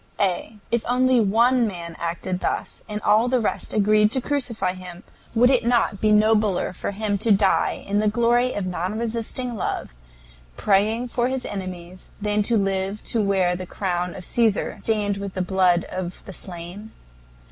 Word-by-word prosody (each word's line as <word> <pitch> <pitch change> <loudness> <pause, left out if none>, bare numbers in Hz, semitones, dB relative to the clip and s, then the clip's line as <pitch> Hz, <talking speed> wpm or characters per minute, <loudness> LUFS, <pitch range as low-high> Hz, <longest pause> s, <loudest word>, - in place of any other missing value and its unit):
A. 200 +2 0
If 235 -1 +1
only 255 +1 +3
one 230 +3 +3
man 170 -4 -6
acted 175 +2 -3
thus, - - -3
and 210 0 -3
all 215 +3 +4
the 255 0 +2
rest 220 - -2
agreed 210 0 +4
to 260 - +3
crucify 245 -8 -1
him, 180 0 -10 0.3
would 245 +3 +5
it 255 - +3
not 235 -4 +1
be 215 - +3
nobler 210 -3 +3
for - - -4
him 205 0 -2
to 220 +2 +1
die 200 -1 +2
in 205 +1 +1
the 215 - +1
glory 240 +3 +2
of 205 - -3
non 180 +3 -3
resisting 235 +2 -1
love, 190 - -3 0.6
praying 215 +5 +2
for 240 0 0
his 260 -1 -3
enemies, 185 -2 -7
than 210 0 0
to 225 +2 +2
live 195 +1 -1
to 230 - 0
wear 190 -3 +2
the 185 0 -6
crown 180 -2 -2
of 180 - -8
Caesar 225 -4 +1
stained 205 -3 0
with 200 -1 -6
the 185 - -1
blood 180 -2 +2
of 185 -1 -6
the 190 - -8
slain? 180 +4 -8
205 Hz, 175 wpm, -23 LUFS, 185-230 Hz, 0.6 s, would